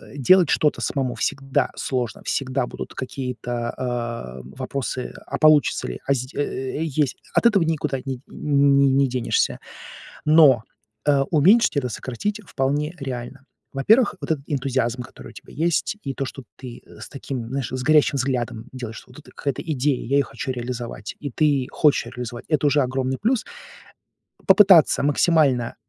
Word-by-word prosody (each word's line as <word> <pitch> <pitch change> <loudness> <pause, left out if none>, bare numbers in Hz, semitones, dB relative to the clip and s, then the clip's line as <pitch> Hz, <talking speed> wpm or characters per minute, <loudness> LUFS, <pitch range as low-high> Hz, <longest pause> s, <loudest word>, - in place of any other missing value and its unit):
делать 170 +5 +5
что-то 150 - +2
самому 130 -4 -2
всегда 135 +3 -1
сложно, 125 -5 -3
всегда 130 -1 -1
будут - - -8
какие-то, 125 -2 -4
а, 120 - -4
вопросы- 130 - -5
а - - -3
получится 155 - +4
ли? 60 - -6
А 140 - +4
зд 130 0 -4
э, 140 0 -3
есть. 145 -2 -1 0.2
Ат - - +2
этого 210 -6 +5
никуда 155 -4 -1
не 130 -2 -4
не 140 -1 +3
не 135 0 +3
денешься. 125 -1 0 0.7
Но, 150 -7 +6 0.4
э, 145 -1 +4
уменьшить 180 +7 +4
это, 130 -3 0
сократить 165 - -4
вполне 145 +4 -1
реально. 130 0 -6 0.3
Во-первых, 210 - +3
вот - - -1
этот 140 -3 -3
энтузиазм, 130 -4 -1
который - - -12
у - - -12
тебя - - -14
есть, 170 +6 0
и 135 - -4
то, 135 - -3
что 135 0 -8
ты 125 -2 -10
с 105 - -11
таким, 135 -4 -6
знаешь, 135 -3 -2
с 130 0 -4
горящим 150 -1 +4
взглядом 125 -3 -2
делаешь, 120 -4 -7
что - - -11
вот - - -13
эта - - -17
какая-то 140 -3 -4
идея, 145 -4 -1
я 140 - +2
её 140 - +3
хочу - - -6
реализовать, 120 -3 -5
и 145 - -5
ты 140 -1 +1
хочешь 150 -6 +2
реализовать, 120 0 -7
это 150 -2 +1
уже 145 0 +3
огромный 130 0 -2
плюс. 230 +1 0 1.0
Попытаться 190 -7 +6
максимально 145 -4 +2
135 Hz, 160 wpm, -22 LUFS, 125-150 Hz, 1.0 s, Но